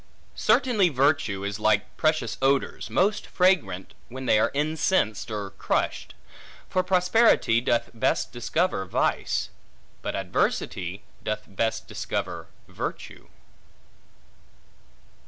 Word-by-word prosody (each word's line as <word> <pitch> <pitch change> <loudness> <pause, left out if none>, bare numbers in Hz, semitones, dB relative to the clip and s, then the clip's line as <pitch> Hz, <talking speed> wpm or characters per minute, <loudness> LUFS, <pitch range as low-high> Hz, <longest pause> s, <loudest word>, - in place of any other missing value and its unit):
Certainly 215 -8 +3
virtue 135 -8 +1
is 100 +1 -3
like 110 0 +1
precious 155 -7 +1
odors, 135 0 +1
most 205 +3 +1
fragrant 170 - +1 0.2
when 130 +2 -7
they 110 - +4
are - - +3
incensed, 150 - 0
or 105 -3 -4
crushed: - - -2 0.5
for 185 - +1
prosperity 180 - +3
doth 120 -1 0
best 115 - 0
discover 120 - 0
vice, - - 0 0.5
but - - -3
adversity 95 0 -1 0.2
doth 110 0 -2
best 110 +3 -2
discover - - -4 0.2
virtue. - - -6
125 Hz, 100 wpm, -26 LUFS, 105-180 Hz, 0.5 s, they